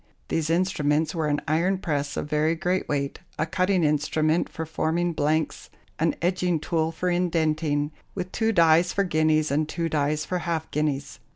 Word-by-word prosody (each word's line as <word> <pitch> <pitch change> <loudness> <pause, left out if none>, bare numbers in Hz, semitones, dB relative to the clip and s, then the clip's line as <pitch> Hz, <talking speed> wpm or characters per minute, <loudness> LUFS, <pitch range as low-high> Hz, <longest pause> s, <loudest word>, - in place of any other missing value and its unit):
These 160 -1 0
instruments 160 -3 +1
were 160 -3 -1
an 145 0 0
iron 170 +5 +2
press 145 -5 -2
of - - -2
very 150 +2 +1
great 180 +2 -1
weight, 140 -1 -2 0.2
a 155 - +1
cutting 185 +2 +1
instrument 155 +2 +1
for 160 - -5
forming 165 +2 -1
blanks, 155 +1 -1 0.3
an 165 +1 +1
edging 180 -2 +1
tool 160 0 0
for 180 +2 -1
indenting, 155 -4 0 0.2
with 185 -1 -4
two 225 0 +1
dies 170 -2 +4
for 200 - +1
guineas 155 -3 +2
and 150 +2 0
two 165 0 -2
dies 150 0 0
for 180 +2 -2
half 165 -2 -3
guineas. 150 -2 -2
160 Hz, 170 wpm, -25 LUFS, 150-175 Hz, 0.3 s, dies